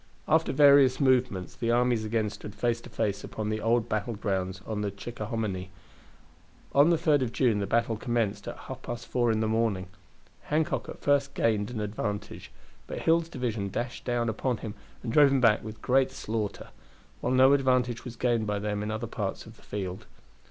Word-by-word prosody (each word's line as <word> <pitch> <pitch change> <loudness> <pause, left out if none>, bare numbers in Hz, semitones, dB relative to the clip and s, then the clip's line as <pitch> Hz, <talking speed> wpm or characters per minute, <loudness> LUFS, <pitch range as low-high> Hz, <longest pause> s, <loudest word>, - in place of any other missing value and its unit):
After 160 +2 +3
various 140 -2 +6
movements 125 -9 +2
the 115 -2 -2
armies 120 -1 +2
again 110 -1 0
stood 105 -1 -9
face 120 +1 0
to 120 - -12
face 105 -3 -2
upon 110 -1 -4
the 110 0 -2
old 115 0 +2
battle 110 +1 -2
grounds 95 -2 -2
on 105 -2 -3
the 105 - -1
Chickahominy. 105 -2 -4 1.0
On 145 +4 +6
the 170 - +5
3d 155 -3 +3
of 125 -3 -1
June 120 -5 +2
the 100 - -2
battle 115 +1 +1
commenced 115 -3 -1
at - - -5
half - - -8
past 120 -1 -6
four 120 -2 +1
in 110 0 0
the 110 - +1
morning. 110 -4 0 0.6
Hancock 155 +1 0
at - - -9
first 140 -1 +2
gained 105 -3 +1
an 120 -3 -5
advantage, 105 -1 -4 0.4
but - - -5
Hill's 165 0 +2
division 115 -9 -2
dashed 120 +5 -4
down 120 -1 0
upon 120 +2 -1
him 110 -2 -6 0.3
and 115 -2 -3
drove 145 -2 +7
him 135 0 +2
back 115 -4 +4
with 110 0 -9
great 135 +1 +3
slaughter; 110 -5 -4 0.5
while 125 - -1
no 130 +2 +6
advantage 125 -3 +2
was 125 -2 -7
gained 115 -2 +1
by 105 0 0
them 105 0 -2
in 105 - -3
other 110 +2 -3
parts 105 -4 -4
of 110 - -13
the - - -21
field. 95 -2 -5
115 Hz, 195 wpm, -28 LUFS, 105-125 Hz, 1.0 s, drove